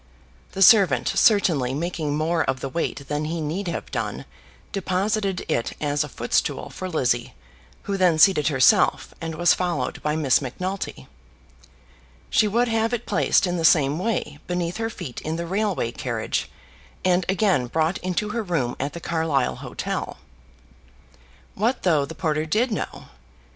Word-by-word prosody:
The 195 - +3
servant, 200 -3 +6
certainly 155 - +3
making 155 -2 -2
more 160 +1 +1
of 130 0 -1
the 135 - -4
weight 140 -1 -3
than 150 +1 -2
he 165 +2 -3
need 165 +6 -3
have 170 - -4
done, - - -3 0.5
deposited 195 0 -1
it 115 - -1
as 145 -1 0
a - - -7
foot - - -7
stool - - 0
for 185 - -6
Lizzie, 120 -7 0 0.5
who 200 -1 -2
then 180 -4 +3
seated 155 -3 +5
herself, 150 - +3
and 165 -1 -4
was 175 +2 +4
followed 180 -2 -2
by 150 0 -1
Miss 150 -5 +3
Macnulty. 185 +9 -5 1.3
She 215 - +4
would 235 +4 +2
have 225 +1 +1
it 240 - -7
placed 155 -5 +2
in 180 -1 -1
the 165 - -2
same 150 -2 +4
way 180 -8 -2
beneath 175 -1 -2
her 225 0 -2
feet 130 - -7
in 155 +1 -3
the 170 +1 -3
railway 190 - -1
carriage, - - -3 0.6
and 180 0 +3
again 190 - +2
brought 160 +6 0
into 185 +3 -2
her 230 +2 -2
room 165 - -1
at 140 +2 -3
the 170 - -6
Carlisle 160 -6 0
hotel. - - -4 1.4
What 235 +6 -1
though 155 -6 +3
the 160 +3 -9
porter 155 -1 -1
did 225 +9 +1
know! - - -4
170 Hz, 160 wpm, -23 LUFS, 150-195 Hz, 1.4 s, servant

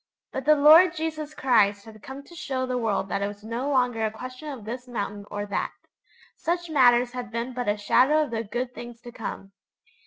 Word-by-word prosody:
But 265 - -4
the 305 0 +6
Lord 315 +4 +7
Jesus 310 -1 -4
Christ 205 -6 +3
had 215 -1 -13
come 270 +4 -9
to 345 - -16
show 265 -6 -3
the 255 0 -2
world 215 -4 0
that 200 - -1
it 200 - 0
was 205 0 -9
no 235 +5 -3
longer 245 -4 +1
a 220 - +2
question 255 +6 -8
of 255 -7 -8
this 245 +3 -6
mountain 205 -3 -5
or 205 0 -4
that. 200 - -2 0.6
Such 345 0 -2
matters 245 -4 +5
had 250 -3 -6
been 235 +3 -4
but 245 -2 -3
a 205 - +1
shadow 270 +9 +4
of 290 - -6
the 225 -1 -2
good 245 +4 -4
things 240 -1 -9
to 240 - -10
come. 205 -4 -7
245 Hz, 215 wpm, -26 LUFS, 220-280 Hz, 0.6 s, Lord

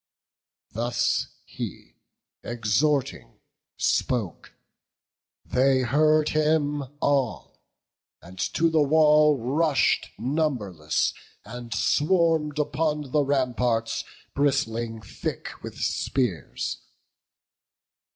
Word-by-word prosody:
Thus 120 +2 0 0.2
he, - - -7 0.5
exhorting, 120 +5 -1 0.4
spoke; 115 -8 -1 0.9
they 130 +1 +3
heard 155 +4 +3
him 150 -2 +1
all, 135 -6 -1 0.6
And 90 +2 -14 0.2
to 165 0 +3
the 160 -1 +3
wall 150 0 +5
rush'd 140 +5 +1
numberless, 120 - -1 0.3
and 120 +1 -9
swarm'd 150 - +2
Upon 150 -2 -1
the 150 - +3
ramparts, 125 -4 0 0.3
bristling 115 -5 0
thick - - -5
with - - -8
spears. - - -2
140 Hz, 75 wpm, -25 LUFS, 120-150 Hz, 0.9 s, wall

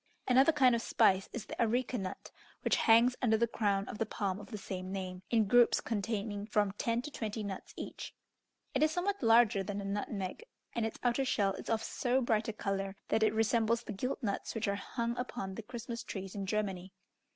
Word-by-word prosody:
Another 265 +5 +6
kind 260 -5 +5
of 235 - +1
spice 195 -5 +3
is 225 -3 -5
the - - -4
areca 245 +2 +1
nut, 190 -5 -5 0.3
which - - +3
hangs 235 +2 +6
under 220 -3 +3
the 235 - +3
crown 200 -4 0
of - - -7
the 225 - +1
palm 195 -3 -2
of 205 - -10
the 215 - -5
same 185 -1 -5
name, 185 -2 -4
in 225 -2 +3
groups 240 +3 +5
containing 210 -1 -3
from 210 -2 +2
ten 230 +4 -1
to 300 - -6
twenty 220 -4 -4
nuts 195 -2 -6
each. - - -7 0.6
It - - +1
is 310 - +5
somewhat 370 +5 -1
larger 225 -4 +5
than 200 +1 -4
a 200 - -5
nutmeg, 200 - -3 0.3
and 230 -1 0
its 225 - -7
outer 245 +2 +2
shell 200 -6 +1
is - - -8
of 225 -1 +1
so 250 0 0
bright 225 -4 +1
a 225 - -2
colour, 195 -1 -2
that 220 - +2
it 215 -1 +4
resembles 225 +1 +2
the 215 - -5
gilt 250 +7 -3
nuts 200 +1 -2
which 225 -1 -1
are 200 - +1
hung 235 +3 -3
upon 240 -6 -4
the 225 - -6
Christmas 235 +1 -6
trees 195 -2 -6
in 200 -2 -4
Germany. 195 -3 -2
220 Hz, 210 wpm, -33 LUFS, 200-235 Hz, 0.6 s, Another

